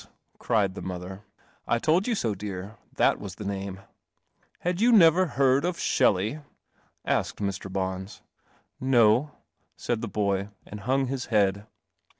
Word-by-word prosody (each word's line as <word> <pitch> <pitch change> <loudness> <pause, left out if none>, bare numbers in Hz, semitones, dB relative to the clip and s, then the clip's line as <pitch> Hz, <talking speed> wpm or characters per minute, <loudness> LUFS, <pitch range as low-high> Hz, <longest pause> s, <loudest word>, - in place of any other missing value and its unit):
cried 105 -5 +1
the - - -8
mother; 95 +2 -7 0.4
"I - - +2
told) 170 - +2
I, - - +2 0.3
lear. 100 +1 -6 0.2
That - - +3
Was 95 -3 -7
the 105 - -8
name." 100 -1 -4
•• 95 - -16 0.8
Had 180 +2 -1
you 240 +2 +5
never 180 -3 +6
heard 135 -1 +2
of 175 0 -1
Shelley?" 105 +9 +2 0.7
asked - - 0
Mr. 100 -1 -4
Bons. 95 +1 -4 0.6
"No," 125 +1 +4 0.6
aid 120 -2 0
the 115 - -3
boy, 100 -2 -1 0.2
and 105 - -8
hung 130 +6 +1
his 130 -1 -3
head. 100 -1 +1
105 Hz, 145 wpm, -26 LUFS, 95-135 Hz, 0.8 s, never